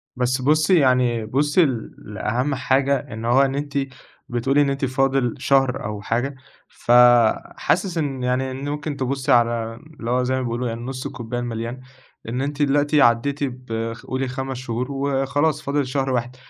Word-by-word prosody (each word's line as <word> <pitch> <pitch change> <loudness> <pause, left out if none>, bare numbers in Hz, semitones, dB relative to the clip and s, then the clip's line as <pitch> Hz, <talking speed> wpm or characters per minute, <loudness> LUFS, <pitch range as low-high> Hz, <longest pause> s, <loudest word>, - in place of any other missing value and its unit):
بس 125 +1 0
بُصي 155 +6 +4
يعني 125 -4 +2
بُصي 145 +8 +2 0.3
لأهم 120 +6 -2
حاجة، 135 +1 +2 0.2
إن 110 +1 -6
هو 120 +3 +4
إن 135 0 +1
أنتِ 145 0 -4 0.6
بتقولي 135 +4 +1
إن 140 - +2
أنتِ 135 0 -1
فاضل 135 -1 +1
شهر 135 -1 +2
أو 105 -1 -4
حاجة 120 +6 -2 0.3
ف - - -4 0.7
حاسس 180 -3 0
إن 135 -5 -2
يعني 130 +1 0
إن 135 +2 -5
ممكن 150 0 -4
تبصي 135 0 -1
على 115 -1 +2 0.2
اللي 115 +1 -3
هو 125 0 +2
زي 130 +1 0
ما 130 - -1
بيقولوا 120 0 -2
يعني 115 0 -4
نص 130 +1 -6
الكوبايه 120 +1 -5
المليان، 120 +1 -5 0.5
إن 125 +3 -2
أنتِ 145 +1 -3
دلوقتي 145 +1 +3
عدّيتِ 135 +5 +2
ب 115 -3 -4
خ 115 - -14
قولي 130 0 -2
5 130 0 -4
شهور 125 +1 -4
وخلاص 140 +2 0
فاضل 140 -1 -1
شهر 135 0 -1
واحد، 125 0 -2
130 Hz, 170 wpm, -22 LUFS, 120-140 Hz, 0.7 s, بُصي